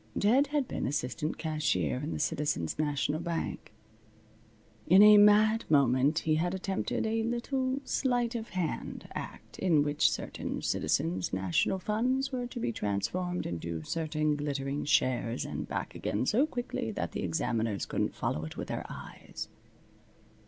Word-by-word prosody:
Ted 255 +8 +4
had 290 -2 0
been - - -2
assistant 145 +3 -2
cashier 155 -5 0
in 150 +4 -4
the - - -3
Citizens' 145 - -1
National 145 0 0
Bank. 170 -8 -4 1.2
In 190 +4 +8
a 210 0 +9
mad 215 +2 +6
moment 140 +1 +4
he 155 -2 +2
had 175 +3 0
attempted 190 +3 -2
a 225 +1 0
little 255 +3 -1
sleight 245 -3 0
of 230 -1 -4
hand 175 -3 -3
act - - -8
in 165 -6 +3
which 145 0 +3
certain - - -4
Citizens' 90 +2 0
National 95 - +1
funds 250 +8 0
were 250 -2 -2
to 240 0 -7
be 120 - -1
transformed 115 - -2
into 85 -1 -4
certain 155 - 0
glittering 145 -1 -2
shares 125 -4 +1
and - - -4
back - - -4
again 110 +5 -2
so 255 - +3
quickly 245 - -3
that 85 -6 -3
the - - -4
examiners 105 +4 -1
couldn't - - -1
follow 75 - -2
it 80 - -7
with - - -5
their - - -4
eyes. - - -8
155 Hz, 150 wpm, -30 LUFS, -, 1.2 s, a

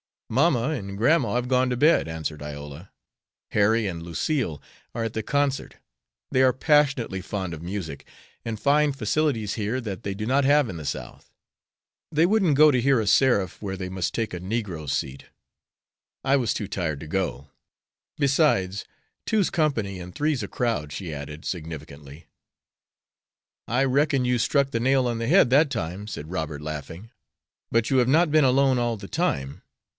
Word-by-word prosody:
"Mamma 130 0 +2
and 100 -10 -4
grandma 120 -1 +2
have 125 0 -1
gone 130 0 +3
to 125 - -1
bed," 150 - +4
answered 80 -2 -5
Iola. 75 +3 -8 0.6
"Harry 110 +2 +3
and 85 -4 -4
Lucille 85 - -2 0.3
are 115 - -1
at 115 - -2
the 110 - -2
concert. 140 +3 -1 0.6
They 130 - +3
are 130 -1 +5
passionately 135 -8 +2
fond 95 -2 -4
of 80 - -7
music, 85 -4 -6 0.4
and 110 -2 -4
find 145 +1 +3
facilities 115 -3 0
here 110 +4 -2
that 100 -6 -6
they 100 - -3
do 105 +2 -5
not 135 +3 +2
have 145 -2 +4
in 85 - -6
the 75 - -7
South. - - -6 0.8
They 160 +3 +4
wouldn't 190 -6 +3
go 155 0 +7
to 125 -3 +1
hear 135 0 +3
a - - -2
seraph 100 -3 +2
where 95 -2 -4
they 95 -1 -5
must 95 -1 -2
take 115 -4 -2
a 90 - -4
negro 90 -6 -4
seat. 70 0 -3 1.0
I 135 +1 +3
was 120 -5 0
too 105 - -4
tired 80 -7 -3
to 80 - -8
go. 80 -5 -3 0.7
Besides, 135 - +2 0.4
'two's 215 -4 +2
company 110 - -1
and 90 0 -9
three's 150 -3 0
a - - -4
crowd,'" 115 - -2
she 85 -5 -5
added, 75 +2 -7
significantly. 75 -3 -7 1.4
"I 125 +3 +1
reckon 140 0 +2
you 125 -1 +1
struck 140 +3 +2
the 115 - -1
nail 130 +1 +2
on 120 -1 -2
the 115 - -2
head 160 -3 +5
that 145 +3 +5
time," 100 - -4
said 80 -6 -7
Robert, 80 -4 -4
laughing. 80 - -7 0.6
"But 115 -1 +1
you 135 - +2
have 125 -1 +3
not 155 +4 +3
been 155 -2 +5
alone 130 0 +3
all 120 -1 0
the 100 -2 -10
time. 70 - -2
115 Hz, 175 wpm, -25 LUFS, 90-135 Hz, 1.4 s, go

